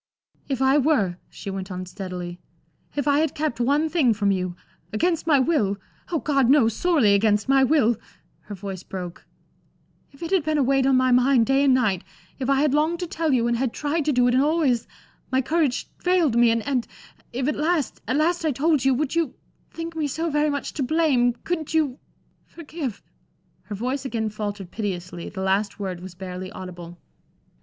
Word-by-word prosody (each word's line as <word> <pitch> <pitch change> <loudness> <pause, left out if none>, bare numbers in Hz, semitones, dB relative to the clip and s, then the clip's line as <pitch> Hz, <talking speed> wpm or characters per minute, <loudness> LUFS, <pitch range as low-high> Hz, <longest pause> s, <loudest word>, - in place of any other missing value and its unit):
"If 265 -1 0
I 270 +2 +4
were," 255 - +2
she 200 - -7
went 190 0 -5
on, 185 -1 -5
steadily, 180 -2 -6 0.6
"if 290 0 -1
I 285 0 +4
had 315 -2 0
kept 300 -6 -2
one 285 +6 +2
thing 290 -8 +2
from 200 -1 +1
you 185 -2 -2 0.4
against 325 +10 0
my 300 -3 +5
will 260 -9 +1 0.3
oh, 335 - +1
God 275 -5 +2
knows! 240 -6 +4
sorely 305 - +3
against 210 0 +2
my 270 0 +5
will" 255 -5 +3 0.5
her 205 - -7
voice 190 -1 -6
broke 180 -3 -8 0.8
"if 275 - -12
it 335 - -4
had 380 -5 +3
been 310 0 0
a 285 - +3
weight 270 0 +2
on 270 - +4
my 255 0 +3
mind 250 -1 +4
day 270 +2 +3
and 265 -2 +5
night 210 -8 +1 0.4
if 260 0 -2
I 275 0 +3
had 295 -2 +2
longed 315 +3 +1
to - - -1
tell 325 -2 -1
you 245 -3 +2
and 235 0 +1
had 250 -1 -1
tried 300 +1 -1
to 300 - +2
do 245 -2 +3
it 245 - +2
and 255 - +4
always 285 -6 +1 0.4
my 260 - +3
courage 295 -1 0
failed 355 -8 +2
me, 235 0 +5
and 230 -1 0
and 260 -4 0 0.4
if 255 +2 -2
at 300 - 0
last 310 -1 -1
at 255 - 0
last, 335 +3 +1
I 315 - +2
told 295 +1 +1
you 270 -1 +3
would 280 +1 -1
you 335 -1 0 0.3
think 330 0 -6
me 310 -2 -1
so 320 +4 -2
very 295 +1 +2
much 285 -1 -3
to 285 - -4
blame, 265 -4 +2
couldn't 320 -2 -3
you 290 -5 +1 0.5
forgive?" 300 - -6 0.6
Her 210 - -5
voice 255 +6 -2
again 225 -5 -2
faltered 205 -3 -5
piteously, 180 -5 -4
the 190 - -6
last 195 +2 0
word 185 -3 -4
was 180 0 -10
barely 185 0 -7
audible. 175 -2 -9
260 Hz, 200 wpm, -24 LUFS, 205-300 Hz, 0.8 s, my